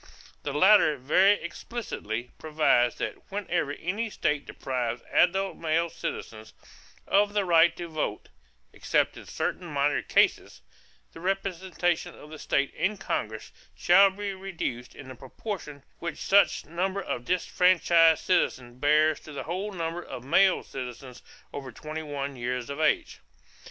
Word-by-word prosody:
The 145 - -4
latter 170 0 +5
very 185 +10 +4
explicitly 160 - -5
provides 150 -6 +2
that - - -6
whenever 175 -7 -1
any 200 +9 -3
state 150 -7 -1
deprives 120 -2 -3
adult 190 +2 +2
male 165 +1 0
citizens 110 -1 -6 0.5
of 205 +1 +2
the 205 -2 +1
right 170 -1 +4
to 175 - -5
vote 155 -9 -4 0.4
(except - - 0
in - - -12
certain 180 - -3
minor 145 -1 +1
cases) - - +1 0.5
the - - -11
representation 185 -1 -2
of 150 - -14
the 155 - -9
state 140 0 0
in 210 +2 -1
Congress 110 - -4 0.2
shall 195 +3 +6
be 200 +1 -5
reduced 175 -11 -5
in 135 - -11
the 130 - -8
proportion 145 - -7 0.2
which 170 - -4
such 200 +1 +3
number 190 +4 -2
of 120 - -4
disfranchised 170 -1 +3
citizens 125 -9 0
bears 155 +1 +3
to 155 - -12
the 140 - -5
whole 185 +6 -4
number 170 -2 -4
of 125 - -8
male 190 +8 +3
citizens 125 -1 -8 0.3
over 135 -2 -6
twenty 155 +6 -6
one 140 -2 -5
years 125 +1 -3
of 140 - -6
age. 155 -1 +1
160 Hz, 140 wpm, -27 LUFS, 135-190 Hz, 0.5 s, shall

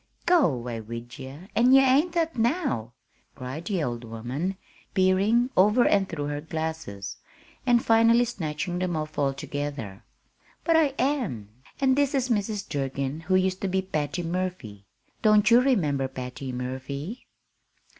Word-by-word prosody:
"Go 320 - +4
'way 120 -1 -5
wid 115 +3 -8
ye, 135 +3 -8
an' 245 +3 +5
ye 270 - +9
ain't 270 +6 +3
that 330 -2 0
now!" 235 - 0 0.4
cried 135 +6 -6
the 190 -6 -1
old 120 -3 -3
woman, 125 +12 -4 0.4
peering 200 +6 +3
over 210 +6 +5
and 195 -2 +2
through 150 -4 -3
her 145 0 -3
glasses, 160 -11 -5 0.5
and 240 -1 +4
finally 230 +1 +5
snatching 175 -5 -3
them 180 -2 -1
off 155 -1 -4
altogether. 140 -6 -3 0.6
"But 330 - +3
I 300 -4 +3
am. 240 - -1 0.3
And 265 -1 +3
this 285 0 +1
is 260 -1 0
Mrs. 210 -2 -1
Durgin, 140 0 -3
who 175 +3 0
used 185 0 +1
to 195 - 0
be 190 0 0
Patty 165 -1 -2
Murphy. 165 - -4 0.3
Don't 215 0 +5
you 240 +1 +8
remember 155 - +1
Patty 130 0 -6
Murphy?" 130 - -5
175 Hz, 145 wpm, -26 LUFS, -, 0.6 s, ye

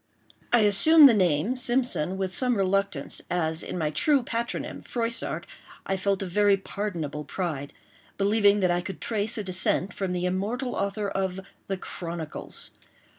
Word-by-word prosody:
I 240 - +5
assumed 280 +10 +7
the 250 - +5
name, 185 - +1
Simpson, 245 -9 +1
with 190 -1 -3
some 250 +2 +2
reluctance, 195 -6 -1
as 160 -2 0
in - - -4
my 155 -3 -1
true 275 - +2
patronym, 235 -2 -4
Froissart, 235 0 +2 0.4
I 195 - -1
felt 195 0 -1
a - - -4
very 200 +2 +3
pardonable 170 -8 -5
pride—believing 195 +7 -1
that 180 -2 +2
I 175 0 0
could 190 +2 -7
trace 220 0 -2
a 215 - -3
descent 185 0 0
from 190 -2 -3
the 180 0 -2
immortal 215 +8 -2
author 200 +1 -2
of 190 -1 -3 0.3
the 195 - -2
"Chronicles." 170 -4 -6
195 Hz, 150 wpm, -26 LUFS, 180-220 Hz, 0.4 s, assumed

